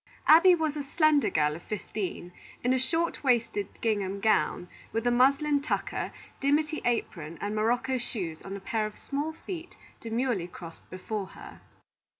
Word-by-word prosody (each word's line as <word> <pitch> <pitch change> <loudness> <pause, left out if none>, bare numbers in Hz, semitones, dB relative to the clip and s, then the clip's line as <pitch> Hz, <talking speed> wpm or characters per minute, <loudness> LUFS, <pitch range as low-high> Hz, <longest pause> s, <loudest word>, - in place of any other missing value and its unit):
Abby 350 +4 +8
was 315 -3 -1
a 295 - -2
slender 300 +1 +3
girl 150 -1 +2
of 165 - -9
fifteen, 190 -3 -4 0.3
in 250 +1 +3
a 260 - +2
short 325 +7 0
waisted 235 -6 +2
gingham 200 -3 0
gown, 180 -4 +2 0.2
with 225 +1 -2
a 245 - +4
muslin 280 +4 +4
tucker, 290 - -2 0.3
dimity 300 +3 +1
apron, 170 -9 -1
and 205 +1 -2
morocco 245 +4 +1
shoes 180 -9 -4
on 195 0 -6
a - - -5
pair 215 +1 -1
of 215 - -11
small 290 +3 -3
feet 335 +1 -8 0.2
demurely 230 -5 -1
crossed 170 -2 -11
before 195 +2 -4
her. - - -12
235 Hz, 155 wpm, -29 LUFS, 195-285 Hz, 0.3 s, Abby